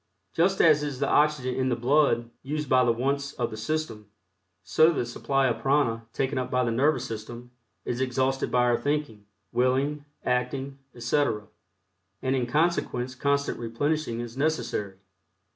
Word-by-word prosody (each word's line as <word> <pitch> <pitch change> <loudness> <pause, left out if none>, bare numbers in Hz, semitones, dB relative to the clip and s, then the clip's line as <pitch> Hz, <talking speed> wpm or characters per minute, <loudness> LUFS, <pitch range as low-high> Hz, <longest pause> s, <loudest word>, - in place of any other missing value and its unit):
Just 190 +4 +2
as 155 -2 +6
is 145 -3 -3
the 140 - +1
oxygen 145 -4 +2
in 130 0 0
the 120 - +1
blood 120 -1 +2
used 150 +3 -3
up - - -15
by 130 0 +6
the 120 - +3
wants 140 +4 -1
of 120 -2 -2
the - - -5
system, 110 -3 -3 0.5
so 125 - +4
the 140 -6 -1
supply 135 +3 0
of 115 -3 0
prana 115 -4 +1
taken 135 +2 -1
up 125 - -3
by 125 0 +1
the 120 - 0
nervous 130 +2 +2
system 120 +2 -7 0.3
is 120 +1 -2
exhausted 130 +1 0
by 125 0 +3
our 120 -1 +3
thinking, 145 -8 -2 0.2
willing, 135 +4 +1 0.2
acting, 135 +2 -1 0.2
etc., 120 -3 0 0.7
and 130 0 0
in 125 -2 0
consequence 130 -3 0
constant 140 +2 0
replenishing 120 +1 -1
is 120 0 -7
necessary. 135 -9 -1
130 Hz, 160 wpm, -27 LUFS, 120-145 Hz, 0.7 s, as